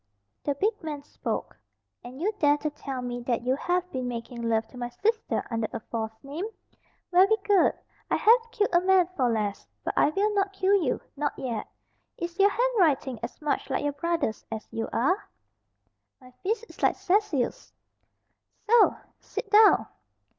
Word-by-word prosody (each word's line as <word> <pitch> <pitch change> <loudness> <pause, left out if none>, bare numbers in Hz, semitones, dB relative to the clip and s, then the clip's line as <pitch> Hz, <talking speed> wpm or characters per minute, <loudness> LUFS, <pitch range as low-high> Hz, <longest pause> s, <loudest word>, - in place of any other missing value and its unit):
The 285 - 0
big 415 +10 0
man 300 -3 -5
spoke. - - -4 0.5
"And 250 +2 -10
you 395 +7 +1
dare 290 -1 +4
to 300 0 -3
tell 270 -3 -5
me 245 0 -4
that 235 -2 0
you 255 +2 +2
have 360 +3 0
been 255 -1 -3
making 235 0 -5
love 225 -1 0
to 255 - -13
my 240 0 -3
sister 440 - -1
under 225 -1 0
a 230 - -4
false 220 0 -5
name? 295 +8 -4 0.7
Very 385 +5 +5
good, 400 -3 +4 0.4
I - - +2
have 460 +1 +4
killed 415 -3 0
a 345 - +5
man 370 -1 +4
for 255 -6 +2
less. 210 -3 -2 0.2
But - - -2
I - - +4
will 410 +7 +1
not 395 -1 +1
kill 390 0 +2
you 340 -11 +2
not 290 0 -2
yet 235 -4 -3 0.5
Is 345 +2 -5
your 400 +1 +7
handwriting 360 - +1
as 235 - -6
much 295 - -1
like 265 - -1
your 290 0 0
brother's 290 -6 -1
as 220 0 -5
you 225 - -3
are?" 365 - 0 0.9
"My 255 -2 -16
fist 440 +4 -1
is - - -15
like - - +3
Cecil's." 360 - 0 0.9
"So! 450 0 +5 0.2
Sit 410 - -6
down." 425 0 +7
295 Hz, 175 wpm, -27 LUFS, 245-395 Hz, 0.9 s, your